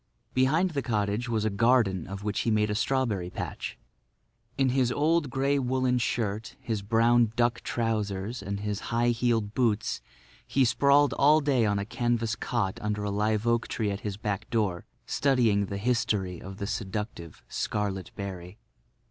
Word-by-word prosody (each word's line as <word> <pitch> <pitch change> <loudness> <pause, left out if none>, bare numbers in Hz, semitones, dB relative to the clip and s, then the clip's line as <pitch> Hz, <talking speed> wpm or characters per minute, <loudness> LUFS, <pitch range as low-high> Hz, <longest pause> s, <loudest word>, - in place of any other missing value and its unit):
Behind 155 +8 +3
the 140 -3 -1
cottage 110 0 -1
was 110 -2 0
a 110 - +1
garden 100 -4 +2
of 100 +1 -7
which 105 0 -1
he - - 0
made 105 -1 +2
a - - +1
strawberry 110 -5 0
patch. - - -5 0.8
In 135 -1 +3
his 125 -1 +2
old 150 +2 +2
grey 140 +2 +1
woolen 130 -1 +1
shirt, 110 -2 -2
his 110 -3 -3
brown 115 +2 +3
duck 120 -1 +1
trousers, 110 -1 -2
and 100 +1 -4
high 115 +3 0
heeled 115 -3 +1
boots 110 -4 0 0.5
he 135 -1 +3
sprawled 140 +3 +4
all 150 +3 +5
day 135 -7 +2
on 105 0 +1
a 100 - -2
canvas 115 0 0
cot 110 -6 -2
under 105 -1 -2
a 105 - -1
live 105 +2 0
oak 115 0 +1
tree 105 -3 -1
at 100 - -4
his 100 -2 -4
back 105 -1 -3
door 105 -7 0 0.2
studying 115 -8 +2
the 100 - -4
history 105 -5 0
of 95 +1 -8
the 100 - -3
seductive, 100 -4 -5
scarlet 100 -3 -2
berry. 95 -1 -7
110 Hz, 165 wpm, -28 LUFS, 100-125 Hz, 0.8 s, all